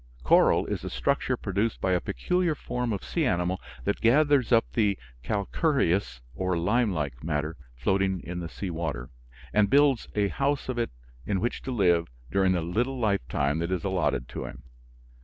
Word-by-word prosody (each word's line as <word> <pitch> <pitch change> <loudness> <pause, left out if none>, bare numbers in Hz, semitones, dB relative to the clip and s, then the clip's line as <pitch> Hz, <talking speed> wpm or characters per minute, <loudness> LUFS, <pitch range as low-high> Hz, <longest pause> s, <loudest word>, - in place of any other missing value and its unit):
Coral - - +5
is - - -3
a - - -4
structure - - 0
produced 100 +3 -1
by 95 - 0
a 90 - +2
peculiar 175 - 0
form 125 -3 -3
of 100 - -3
sea 170 - -1
animal 90 -6 0 0.2
that - - -1
gathers 140 +1 +4
up 115 -1 +5
the 105 -4 +2 0.2
calcareous 100 - 0
or 90 +4 -1
lime 105 +6 +2
like 70 -7 -3
matter 75 0 -2 0.2
floating 95 +8 +1
in 90 0 -5
the 85 -1 -5
sea 95 +1 -5
water, 75 -8 -4 0.4
and 105 -1 +4
builds 140 -2 +4
a 100 -1 +2
house 140 +2 -1
of 125 -2 -1
it 115 - 0 0.4
in 100 -2 +1
which 120 - -2
to 130 - -5
live 90 -7 +3 0.2
during 95 -1 +3
the 90 - 0
little 120 +10 -1
lifetime 80 - 0
that 85 +2 -2
is 90 -3 -1
allotted 80 -10 0
to - - -5
him. - - -9
95 Hz, 175 wpm, -27 LUFS, 85-120 Hz, 0.4 s, Coral